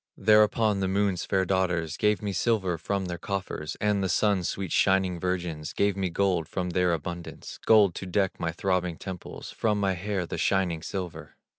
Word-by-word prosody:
Thereupon 105 0 +4
the 95 - 0
Moon's 95 -2 0
fair 95 -1 +1
daughters 85 -4 0
Gave 105 +2 +1
me 100 -1 -2
silver 95 -4 0
from 100 +3 -2
their 85 -1 -5
coffers; 95 -6 -4
And 105 -2 +1
the 95 - 0
Sun's 95 0 +2
sweet 95 -3 -4
shining 95 -2 +2
virgins 85 -4 -3
Gave 100 -1 +1
me 95 -2 -1
gold 90 -2 +1
from 90 +1 -3
their 90 0 +2
abundance, 85 +1 -5
Gold 105 -5 +6
to 95 - -6
deck 95 +1 0
my 80 - -1
throbbing 90 -1 -1
temples, 95 -2 -8
For 110 -2 0
my 100 -2 +1
hair 95 0 -2
the - - -5
shining 90 -4 +1
silver. 90 +1 -6
95 Hz, 180 wpm, -27 LUFS, 85-100 Hz, -, Gold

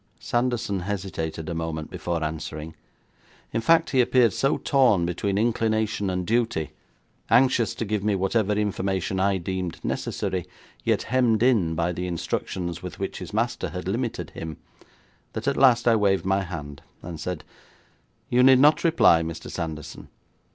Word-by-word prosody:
Sanderson 120 -5 -1
hesitated 90 -5 -4
a 85 - -3
moment 80 -1 -4
before 85 -2 -3
answering; 75 0 -5 0.8
in 115 - 0
fact, 165 +5 +3
he 130 - +4
appeared 120 -3 +3
so 135 - +1
torn 125 - +3
between 95 +3 -1
inclination 110 -2 0
and 90 -1 -2
duty; 115 -7 0 0.6
anxious 120 -1 +3
to 115 - -3
give 105 -1 -2
me 105 -1 +1
whatever 95 +2 +1
information 95 -2 -1
I 100 0 +2
deemed 90 -1 -4
necessary, 95 -3 -2 0.4
yet - - +1
hemmed 120 -3 +2
in 105 -11 +3
by 85 +2 0
the 90 +1 -4
instructions 85 0 -3
with 90 - -7
which 95 - -4
his 90 - -7
master 115 +3 -1
had 90 0 -6
limited 115 +4 -2
him, 80 -2 -7 0.8
that - - -5
at - - +2
last 125 -3 +4
I 115 - +6
waved 100 -3 +2
my 95 +1 +2
hand 75 -6 -7 0.2
and 85 -2 -7
said: 90 -2 -4 0.8
'You 125 - +3
need 130 0 +7
not 150 +4 +5
reply, 160 - +5
Mr. 80 0 -6
Sanderson. 80 -3 -6
95 Hz, 155 wpm, -25 LUFS, 85-115 Hz, 0.8 s, need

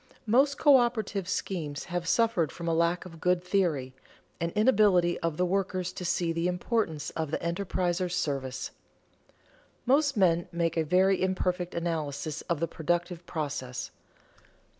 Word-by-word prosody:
_Most 275 +6 +4
coöperative 240 - +3
schemes 155 -7 -3
have 175 -2 -4
suffered 190 - +2
from 170 0 -7
a 165 - +2
lack 170 +2 +1
of 165 -3 -11
good 180 0 +2
theory, 170 -9 0 0.5
an 170 - -1
inability 205 -6 +4
of 165 -2 -2
the 180 - +2
workers 185 -1 -1
to 185 - -6
see 170 -1 0
the 165 +1 0
importance 180 -4 -1
of 160 -2 -3
the - - -1
enterpriser's 180 0 -1
service._ 135 -6 -2 1.1
Most 275 0 +3
men 175 -3 +3
make 170 -1 0
a 165 - +2
very 185 +4 +3
imperfect 180 -1 -1
analysis 155 -3 -3
of 170 -3 0
the 165 - 0
productive 175 +2 -2
process. 135 -5 -4
175 Hz, 140 wpm, -28 LUFS, 165-190 Hz, 1.1 s, Most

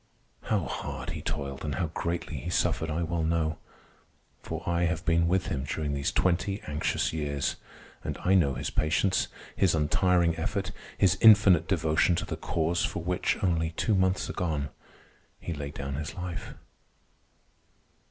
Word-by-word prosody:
How - - +1
hard - - -5
he - - -5
toiled 70 -1 -4
and 75 -2 -2
how 85 -4 -2
greatly 85 -2 -3
he 65 - -5
suffered, 80 -1 +1
I 80 +2 -1
well 85 0 -1
know; 80 -1 0 0.8
for - - -6
I 85 0 +2
have 85 0 -1
been 85 -1 +3
with 90 +1 +2
him 65 -4 -2
during 75 +1 -2
these 70 0 -1
twenty 95 +2 +1
anxious 75 +1 -1
years 70 -3 -1 0.5
and - - -3
I 95 - +3
know 75 -8 +4
his - - -3
patience, 90 +5 +1 0.3
his 95 -4 +3
untiring 85 +2 +2
effort, 80 - -2 0.3
his 95 -1 +3
infinite 100 -7 +7
devotion 80 -1 +2
to 95 +4 -2
the 85 - -4
Cause 85 +1 0
for 80 +2 -2
which, 90 +1 0
only 80 -3 +1
two 110 - +1
months 95 -1 +2
gone, 75 -6 -2 0.7
he 85 - -4
laid 70 -1 -6
down 70 0 -4
his 75 +2 -4
life. 90 -1 -5
85 Hz, 160 wpm, -28 LUFS, 75-90 Hz, 0.8 s, infinite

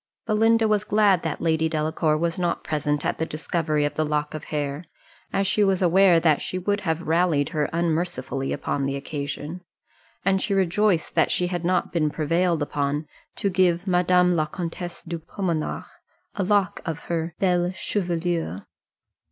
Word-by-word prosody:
Belinda 225 +1 +3
was 210 -1 +2
glad 205 -4 +3
that 165 -2 -3
Lady 160 -1 +1
Delacour 155 0 0
was 170 +2 -1
not 175 -1 -1
present 150 -1 -1
at - - -1
the 160 - 0
discovery 155 -1 -1
of 145 - -1
the 155 - 0
lock 150 -1 -1
of 155 - -6
hair, 145 +1 -3 0.5
as 195 0 +1
she 205 +2 +2
was 195 -2 +2
aware 180 -1 +5
that 155 -3 +3
she 185 - -4
would 200 +3 0
have 165 -1 -1
rallied 160 -3 +2
her 150 -3 -1
unmercifully 165 -5 -1
upon 140 -1 -1
the 140 - -2
occasion; 145 +4 -5 0.6
and 195 -1 +3
she 200 - 0
rejoiced 190 -1 +1
that - - +3
she 180 - +1
had 175 -1 -3
not 180 +2 0
been 155 -3 +2
prevailed 165 +2 +1
upon 145 +1 -2 0.3
to 200 - -1
give 180 -1 +2
Madame 180 -1 +3
la 155 -2 +1
Comtesse 175 0 -5
de 170 0 -5
Pomenars 165 -1 -3 0.5
a 200 - -3
lock 195 -1 +1
of 165 -1 -4
her 165 -1 -3
belle 180 -2 +1
chevelure. 170 - -2
170 Hz, 170 wpm, -24 LUFS, 155-185 Hz, 0.6 s, aware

